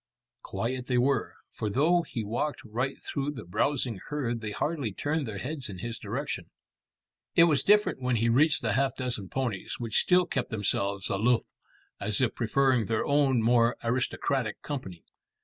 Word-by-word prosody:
Quiet 125 +2 -3
they 125 - +1
were, 135 +3 +1 0.2
for 110 - -3
though 160 - +3
he 120 -8 -5
walked 120 +8 -2
right 125 +5 -2
through 140 0 -2
the 130 - -8
browsing 120 +3 0
herd 120 -6 -2
they 110 - -3
hardly 140 +1 -2
turned 145 +7 -2
their 105 -2 -5
heads 135 +4 -4
in 95 - -7
his 115 +4 -4
direction. - - -4 0.9
It 165 - +8
was 155 -6 +4
different 210 -7 +3
when 125 -1 +1
he 115 +1 +2
reached 145 +6 +3
the 110 -2 +1
half 135 +2 +1
dozen 120 -8 -3
ponies, 120 -8 -3
which 115 -4 +1
still 180 0 +4
kept 130 - -2
themselves 100 -2 -1
aloof 115 +5 +2 0.6
as 100 0 +2
if 130 -3 +2
preferring 125 0 +2
their 115 -1 0
own 140 -5 +3
more 120 +1 +3
aristocratic 125 0 -1
company. 95 - -6
125 Hz, 165 wpm, -28 LUFS, 110-140 Hz, 0.9 s, It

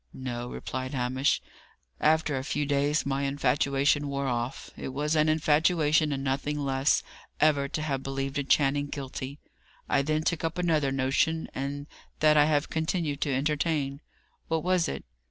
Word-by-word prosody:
"No," 120 -2 -4
replied 130 +2 -5
Hamish. 130 +2 +1 0.6
"After 155 -1 +2
a 130 - -2
few 145 +1 -1
days 145 +1 +1
my 140 0 -1
infatuation 140 +1 +1
wore 140 0 -2
off. 120 +1 -3
It - - -6
was 145 +4 -1
an 155 0 +3
infatuation, 155 0 +3
and 135 -1 -2
nothing 140 +2 -1
less, 135 -1 +1 0.4
ever 145 -2 +3
to 155 - -3
have 135 -3 -1
believed 135 +1 -3
a - - 0
Channing 145 +1 +2
guilty. 135 -1 -6 0.5
I 140 - +3
then 155 +2 0
took 170 0 -1
up 165 +1 -2
another 155 -6 +1
notion, 135 +5 +1
and 140 +1 -4 0.3
that 155 0 +5
I 150 -1 +6
have 150 0 +1
continued 160 -2 -1
to 145 - 0
entertain." 145 0 0 0.5
"What 160 -1 0
was 180 -1 +2
it?" 70 - -5
145 Hz, 160 wpm, -28 LUFS, 135-155 Hz, 0.6 s, I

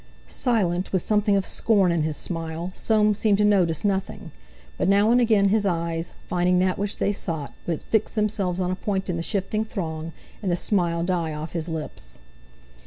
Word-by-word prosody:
Silent, 190 -8 0
with 185 -3 +1
something 210 -1 +2
of 195 - 0
scorn 200 -6 +2
in 170 -2 +1
his 155 -1 -1
smile, 165 +1 -4
Soames 210 -1 +2
seemed 210 -3 +3
to 210 - +3
notice 180 -5 +2
nothing; 195 -1 -2 0.4
but - - 0
now 205 +3 +4
and 245 +1 +5
again 215 -4 +4
his 215 +1 +2
eyes, 170 -3 -1 0.2
finding 180 0 +2
that 185 +1 +1
which 205 0 -2
they 205 - +1
sought, 160 -7 -4
would 165 -3 -2
fix 220 +1 0
themselves 205 -4 0
on 180 -1 0
a - - -1
point 190 0 -2
in - - -2
the - - -2
shifting 205 +4 -1
throng, 165 -6 -5 0.3
and 190 -4 -1
the 175 - +1
smile 170 -4 0
die 170 -3 -1
off 155 +2 -6
his 165 -1 -3
lips. 150 - -6
185 Hz, 190 wpm, -24 LUFS, 170-205 Hz, 0.4 s, and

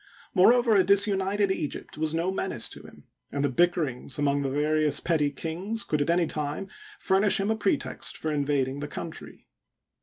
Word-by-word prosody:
Moreover, 230 +4 +5
a 190 - +5
disunited 200 0 +2
Egypt 150 -6 -4
was 155 +1 -1
no 170 +3 0
menace 190 -10 -1
to - - -10
him, - - -15 0.3
and 140 0 -1
the 140 - 0
bickerings 150 -3 0
among 145 -1 +1
the 135 - -1
various 150 +2 +1
petty 155 -4 +1
kings 175 - -3
could 150 -1 -1
at 145 - -1
any 170 0 +3
time 150 +5 -4 0.3
furnish 195 +2 +2
him 200 +2 0
a - - +1
pretext 205 -2 -1
for 155 - -3
invading 140 -2 0
the 145 - -4
country. 165 +2 -8
160 Hz, 175 wpm, -27 LUFS, 145-195 Hz, 0.3 s, Moreover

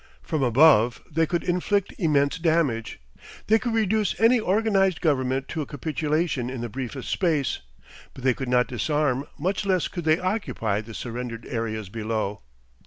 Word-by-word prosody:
From 155 -4 -2
above 125 -2 +5
they 165 +1 +2
could 170 +3 -1
inflict 185 +3 0
immense 150 -3 +2
damage; 155 -9 0 0.5
they 220 +1 +4
could 235 -1 -2
reduce 215 -2 +1
any 235 +2 +5
organised 195 -3 +2
Government 135 -4 0
to 160 - -3
a 145 - -5
capitulation 150 -2 -1
in 130 -2 -5
the 120 - -4
briefest 130 +2 -6
space, 155 -7 0 0.6
but 130 - -10
they 130 -1 +4
could 130 +1 -5
not 125 0 +4
disarm, 140 +1 0
much 185 +7 -1
less 185 -3 +1
could 175 -3 -6
they 155 0 +4
occupy, 185 - -1
the 110 0 -11
surrendered 120 -1 -5
areas 110 -4 -3
below. 110 -1 -3
145 Hz, 160 wpm, -25 LUFS, 125-180 Hz, 0.6 s, above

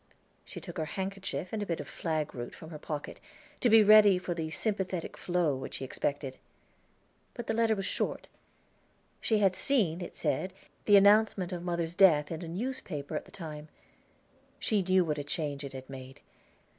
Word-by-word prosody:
She - - -8
took - - -8
her 160 - 0
handkerchief 190 -1 -3
and 215 - -1
a - - -1
bit 170 - -2
of - - -6
flagroot 150 -7 -3
from 160 0 -11
her 155 - -7
pocket, 150 -1 -5 0.4
to 245 - +3
be 220 -1 +8
ready 210 -2 +8
for 180 -1 -3
the 160 -2 -3
sympathetic 190 -2 -2
flow 175 -5 0
which 130 - -6
she 135 - -4
expected. 140 0 -3 1.0
But 240 - -5
the 225 - -1
letter 225 -1 +3
was 195 -1 -3
short. - - -2 0.9
She 220 - +2
had 195 -3 +3
seen, 190 - +1
it 175 - -7
said, 185 0 -1 0.3
the 205 -1 +7
announcement 200 -2 +4
of 175 - -4
mother's 170 -1 -2
death 160 -6 +5
in 165 0 -4
a 170 - -6
newspaper 180 - -4
at - - -3
the - - -17
time. 155 -4 -8 0.9
She 210 -3 +1
knew 185 0 +3
what 150 -2 -1
a - - -3
change 145 -1 -3
it 140 -1 -7
had 130 0 -8
made. 130 -1 -10
175 Hz, 180 wpm, -30 LUFS, 150-200 Hz, 1.0 s, be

